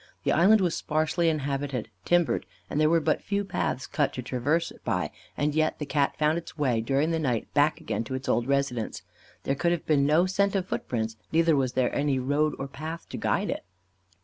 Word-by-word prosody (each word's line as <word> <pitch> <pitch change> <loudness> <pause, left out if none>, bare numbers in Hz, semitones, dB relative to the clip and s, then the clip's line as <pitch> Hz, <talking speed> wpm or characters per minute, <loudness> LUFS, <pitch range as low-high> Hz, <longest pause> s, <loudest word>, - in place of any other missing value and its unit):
The - - +2
island 200 +5 +5
was 175 -3 +1
sparsely 155 +2 +1
inhabited, 140 -5 -2 0.2
timbered, 175 -2 +2 0.2
and 150 - +1
there 155 - +4
were 165 0 +4
but 155 0 0
few 200 0 -1
paths 130 -7 -2
cut 145 -1 0
to 125 - -5
traverse 145 +7 0
it - - -16
by, 90 -9 -1 0.3
and 150 0 +1
yet 155 0 +1
the 150 - -4
Cat 140 -1 0
found 155 +2 +2
its 170 - -12
way 125 -6 +1
during 140 +7 +1
the 165 - 0
night 125 -7 -1
back 150 +2 +3
again 150 -7 -2
to 130 - -4
its 130 0 -5
old 120 +1 +1
residence. 140 -5 -1 0.4
There 135 - 0
could 170 +5 +1
have 175 -2 -1
been 140 -3 +3
no 160 +4 +4
scent 200 +2 +1
of 190 -2 0
foot - - -4
prints, 110 -2 -2
neither 165 0 +4
was 130 -3 0
there 130 -1 +1
any 140 -2 +1
road 145 +4 +1
or 135 - -4
path 160 +4 -7
to - - -5
guide - - 0
it. - - -4
150 Hz, 220 wpm, -27 LUFS, 130-165 Hz, 0.4 s, island